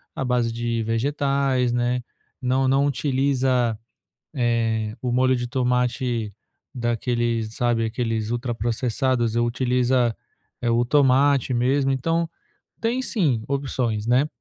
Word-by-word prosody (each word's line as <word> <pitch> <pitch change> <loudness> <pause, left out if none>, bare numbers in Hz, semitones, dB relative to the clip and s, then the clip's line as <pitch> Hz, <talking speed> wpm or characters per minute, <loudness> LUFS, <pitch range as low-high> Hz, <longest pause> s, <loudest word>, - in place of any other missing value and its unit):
à - - -2
base 125 -2 +1
de 115 -1 -2
vegetais, 135 +1 0
né. 120 +1 0 0.4
Não 130 +1 +1
não 135 +2 +3
utiliza, 130 -3 +1 0.6
eh, 115 -3 0
o 125 -1 -1
molho 130 +1 +3
de 120 - -3
tomate 125 -2 0 0.4
daqueles, 120 -1 -1
sabe, 120 -2 +1
aqueles 115 -1 -2
ultraprocessados, 120 0 -1
utiliza, 125 0 +1 0.5
é 120 - +1
o 115 +1 +3
tomate 135 0 +3
mesmo. 135 +3 +2
Então, 165 +6 0 0.6
tem 235 +3 0
sim 150 - 0
opções, 125 -6 -1
né. 125 +5 +3
125 Hz, 110 wpm, -23 LUFS, 115-135 Hz, 0.6 s, não